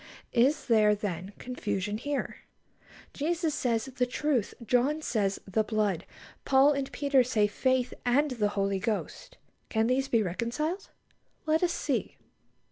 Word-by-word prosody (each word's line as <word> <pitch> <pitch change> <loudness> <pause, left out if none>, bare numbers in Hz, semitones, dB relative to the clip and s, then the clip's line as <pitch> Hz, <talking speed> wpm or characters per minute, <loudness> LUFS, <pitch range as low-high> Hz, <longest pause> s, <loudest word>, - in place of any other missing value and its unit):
Is 265 +5 +3
there, 215 -3 +4
then, 190 -2 -4
confusion 210 -4 -3
here? 285 +2 -3 0.8
Jesus 325 +1 -1
says, 235 -5 0
"the 255 -2 -1
truth"; 255 -4 -1
John 270 +7 +2
says, 200 -7 0
"the 215 +3 +1
blood"; 210 -5 -1 0.4
Paul 270 +2 +5
and 275 -2 -2
Peter 280 -3 +3
say, 225 -4 +2
"faith," 255 +4 0
and 275 +4 +2
"the 220 -4 +1
Holy 195 -1 +1
Ghost." 215 +2 -4 0.3
Can 220 0 +1
these 260 +3 +1
be 230 -4 +2
reconciled? 240 - -3 0.6
Let 315 +1 +2
us 350 -1 +2
see. - - -2
245 Hz, 135 wpm, -29 LUFS, 210-280 Hz, 0.8 s, Paul